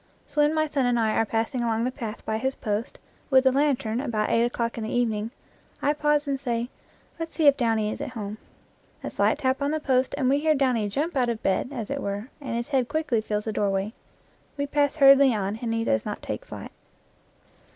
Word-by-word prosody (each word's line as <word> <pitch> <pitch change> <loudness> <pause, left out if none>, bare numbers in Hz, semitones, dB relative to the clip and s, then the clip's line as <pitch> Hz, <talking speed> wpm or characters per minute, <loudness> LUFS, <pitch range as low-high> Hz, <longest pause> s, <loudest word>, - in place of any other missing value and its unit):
So 295 +1 0
when 295 +2 +3
my 310 0 +2
son 280 -4 0
and 245 -1 +2
I 220 -2 +2
are 225 - +1
passing 230 +4 -1
along 230 -1 0
the 250 - 0
path 225 -5 -7
by 220 0 -1
his 265 +2 -1
post 210 +1 -3 0.3
with 265 -1 +5
a 260 - +6
lantern 260 -4 +1
about 220 -6 -1
eight 230 - +4
o'clock 235 -1 -1
in 230 - -4
the 220 - -3
evening, 225 -3 0 0.5
I 290 - +2
pause 295 0 +1
and 275 -1 -1
say, 240 -2 -2 0.5
"Let's 330 0 -5
see 320 - +1
if 285 -1 +7
Downy 225 -4 +1
is - - -6
at - - -3
home." 210 0 -5 0.6
A - - -4
slight - - +2
tap 260 +1 0
on 280 - +1
the 310 +1 0
post 260 -3 +1
and 260 - +1
we 275 +2 +3
hear 310 +1 +3
Downy 250 -6 +1
jump 290 - -2
out 250 -3 +2
of 230 -2 -3
bed, 195 +5 +1
as 235 -5 -5
it 280 0 -2
were, 200 +5 -4
and 255 -4 -4
his 235 +3 -3
head 265 -4 +1
quickly 295 -7 0
fills 210 -1 -2
the 220 - -2
doorway. 200 +1 0 0.6
We 285 - 0
pass 285 0 +1
hurriedly 275 -3 +7
on 205 +1 -2
and 235 -2 -2
he 225 0 0
does 110 - +1
not - - -5
take - - -5
flight. - - -8
245 Hz, 230 wpm, -26 LUFS, 220-280 Hz, 0.6 s, if